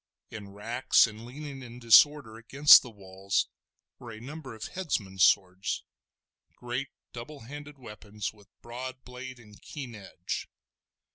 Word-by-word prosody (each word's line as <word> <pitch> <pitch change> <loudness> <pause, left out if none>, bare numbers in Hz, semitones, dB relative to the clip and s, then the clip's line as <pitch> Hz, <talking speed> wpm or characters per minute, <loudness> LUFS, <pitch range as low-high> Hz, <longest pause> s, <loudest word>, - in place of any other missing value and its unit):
In 105 -3 -8
racks, 115 +5 +3
and 110 +1 -9
leaning 140 +1 -8
in 120 -1 -10
disorder 125 +1 +5
against 140 +6 +7
the 125 - -10
walls, 95 -2 -2 0.5
were 120 -3 -10
a 110 - -9
number 135 0 -9
of 110 - -9
headsmen's 100 - -1
swords, 95 +1 +2 0.7
great 125 +3 -4 0.3
double 130 +5 -9
handed 145 +4 -10
weapons 105 -4 -7
with 105 -2 -21 0.2
broad 130 +2 -7
blade 125 0 -9
and 105 -3 -17
keen 135 -6 -8
edge. 95 -4 -6
120 Hz, 135 wpm, -29 LUFS, 105-130 Hz, 0.7 s, against